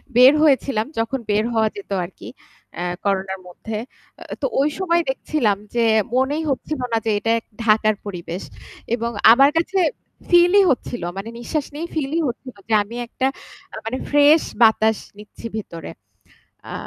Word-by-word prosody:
বের 255 +3 +8
হয়েছিলাম 270 -6 +2
যখন 230 +4 -1
বের 210 +1 +2
হওয়া 220 -1 +3
যেত 200 0 -10
আরকি, 180 - -11 0.5
আ - - -1 0.2
করোনার 190 -1 -1
মধ্যে। 215 +5 -6 0.6
তো - - 0 0.2
ওই 290 - +2
সময় 345 -2 +2
দেখছিলাম 260 -6 0 0.2
যে, 235 -1 +3 0.3
মনেই 280 +5 +1
হচ্ছিল 285 +2 -2
না - - +3
যে 220 - +1
এটা 225 +2 +1 0.3
ঢাকার 215 -1 +3
পরিবেশ 180 -2 -6 0.5
এবং 235 0 -3 0.2
আমার 275 +3 +6
কাছে, 360 +4 +1 0.5
ফিল-ই 355 +3 +6
হচ্ছিল 245 -4 -3
মানে, 200 +3 -5
নিশ্বাস 285 +4 -2
নেই 320 +3 -4
ফিল-ই 310 +2 -1
হচ্ছিল, 255 0 -7
যে 225 - -1
আমি 220 +3 -10
একটা 260 +3 -1 0.6
মানে 235 +3 -2
ফ্রেশ 290 +2 +5 0.2
বাতাস 220 -1 +5 0.2
নিচ্ছি 210 +2 -13
ভেতরে 170 -6 -7 0.8
আ - - -5
235 Hz, 145 wpm, -21 LUFS, 215-290 Hz, 0.8 s, বের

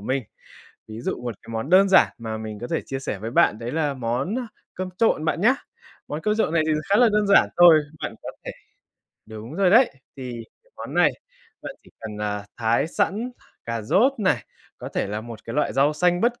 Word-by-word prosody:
mình. 130 +6 -1 0.7
Ví 110 +1 -8
dụ 120 - -3
1 120 -3 -4
cái 115 - -11
món 115 +8 -4
đơn 195 +2 +6
giản 190 - +5
mà 110 -1 -5
mình 110 -1 -7
có 120 - -4
thể - - -1
chia 135 - -4
sẻ 105 -6 -4
với 110 +3 -5
bạn 150 -7 +3
đấy 120 +1 -5
là 150 -3 0
món 130 - -2 0.4
cơm 185 0 -4
trộn 220 -9 +2
bạn 165 +1 0
nhá. 245 +6 +5 0.5
Món 150 +2 -4
cơm 210 +3 0
trộn 215 -7 +1
này 165 -2 +3
thì 155 - +2 0.2
khá 200 - +5
là 245 0 +6
đơn 210 -1 +2
giản 200 - +5
thôi, 170 -3 +8 0.2
bạn - - -4
có - - -6
thể - - -4 0.8
đúng 110 +6 -9
rồi 190 -1 +3
đấy, 240 +5 +6 0.3
thì 130 -2 -6 0.3
cái - - -31
món - - -7
này, - - +5 0.5
bạn - - -7
chỉ - - -20
cần, 105 -2 -7
à, 105 -1 -3
thái 115 +4 +1
sẵn 220 +9 -1 0.3
cà 115 -1 -3
rốt 225 - +3
này, 190 -3 +1 0.3
có - - -7
thể - - -2
là 105 +2 -4
1 115 -1 -10
cái 115 - -6
loại 150 - 0
rau 140 +3 +3
xanh 175 +3 +1
bất 240 +1 +1
145 Hz, 225 wpm, -23 LUFS, 115-190 Hz, 0.8 s, thôi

